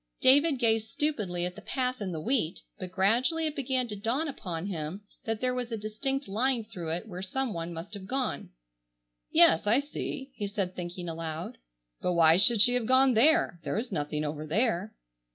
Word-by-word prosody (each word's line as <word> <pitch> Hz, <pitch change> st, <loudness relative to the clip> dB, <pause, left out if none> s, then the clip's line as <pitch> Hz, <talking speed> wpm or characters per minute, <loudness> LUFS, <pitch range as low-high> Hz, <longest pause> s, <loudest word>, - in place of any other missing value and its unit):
David 285 Hz, +3 st, +5 dB
gazed 225 Hz, -2 st, +1 dB
stupidly 210 Hz, -14 st, -1 dB
at 180 Hz, -, -3 dB
the 215 Hz, -, -11 dB
path 255 Hz, +1 st, -2 dB
in 190 Hz, -2 st, -3 dB
the 160 Hz, -, -4 dB
wheat, 215 Hz, -, -1 dB, 0.2 s
but 185 Hz, -, -5 dB
gradually 240 Hz, -, +2 dB
it 305 Hz, -1 st, -2 dB
began 260 Hz, -3 st, -1 dB
to 210 Hz, -, -5 dB
dawn 230 Hz, +10 st, -1 dB
upon 180 Hz, -, -5 dB
him 180 Hz, +1 st, -5 dB, 0.2 s
that 225 Hz, -1 st, -2 dB
there 255 Hz, 0 st, +1 dB
was 250 Hz, -1 st, -3 dB
a 225 Hz, -, -2 dB
distinct 270 Hz, +6 st, -3 dB
line 235 Hz, +4 st, 0 dB
through 180 Hz, -7 st, -7 dB
it 170 Hz, +6 st, -3 dB
where 180 Hz, -3 st, -7 dB
some 245 Hz, +5 st, -2 dB
one 170 Hz, 0 st, -4 dB
must 170 Hz, +5 st, -8 dB
have 195 Hz, -2 st, -7 dB
gone. 260 Hz, +2 st, -2 dB, 0.8 s
"Yes, 160 Hz, +5 st, +5 dB
I 230 Hz, +5 st, +5 dB
see," 280 Hz, -1 st, -5 dB
he 205 Hz, -5 st, -4 dB
said 195 Hz, -2 st, -3 dB
thinking 175 Hz, 0 st, -6 dB
aloud, 160 Hz, -, -5 dB, 0.4 s
"but 180 Hz, -, 0 dB
why 165 Hz, -1 st, +6 dB
should 215 Hz, +3 st, +6 dB
she 245 Hz, +3 st, +6 dB
have 245 Hz, -3 st, 0 dB
gone 260 Hz, 0 st, +5 dB
there? 290 Hz, -, +4 dB
There -, -, -2 dB
is 240 Hz, +3 st, -3 dB
nothing 150 Hz, 0 st, -2 dB
over 150 Hz, +1 st, -4 dB
there." 210 Hz, +2 st, 0 dB
215 Hz, 195 wpm, -29 LUFS, 175-255 Hz, 0.8 s, why